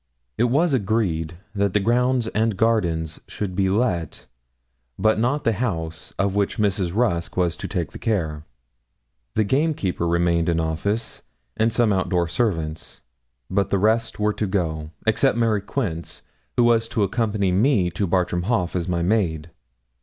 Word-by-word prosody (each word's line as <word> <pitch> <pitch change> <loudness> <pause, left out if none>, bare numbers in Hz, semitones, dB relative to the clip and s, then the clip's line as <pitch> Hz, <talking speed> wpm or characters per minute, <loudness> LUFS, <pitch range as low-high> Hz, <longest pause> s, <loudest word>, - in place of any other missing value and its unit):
It 120 - +2
was 145 +6 +2
agreed 95 -8 0 0.2
that 100 -2 0
the - - +5
grounds 125 +3 +2
and 110 -2 0
gardens 85 -8 0
should 100 -3 -4
be 95 0 +2
let, 95 - -1 0.7
but 110 0 +2
not 130 +6 +1
the 115 - +3
house, 80 -8 -3
of 100 -1 +1
which 100 +2 0
Mrs. 100 -4 +1
Rusk 100 -9 0
was 90 -3 +1
to - - -5
take - - -3
the - - -9
care. 80 -9 -1 0.9
The 110 - +3
gamekeeper 130 - 0
remained 85 0 +2
in 85 -1 +1
office, 100 +8 -2 0.3
and 115 +1 +2
some 115 -3 +2
out 95 -1 0
door 90 -2 +1
servants. 80 -5 -2 0.5
But 100 +1 0
the 100 - +2
rest 110 +4 +1
were 105 0 +2
to 105 - -2
go, 80 -5 -2 0.2
except 115 +3 +3
Mary 115 -3 +2
Quince, 95 -7 -4 0.3
who 120 - +5
was 115 -1 +3
to 110 -2 0
accompany 100 -2 0
me 100 -2 +3
to 100 +3 -1
Bartram 90 -1 0
Haugh 105 -8 +1
as 85 -2 -1
my 85 -1 0
maid. 85 -5 0
100 Hz, 160 wpm, -23 LUFS, 85-115 Hz, 0.9 s, the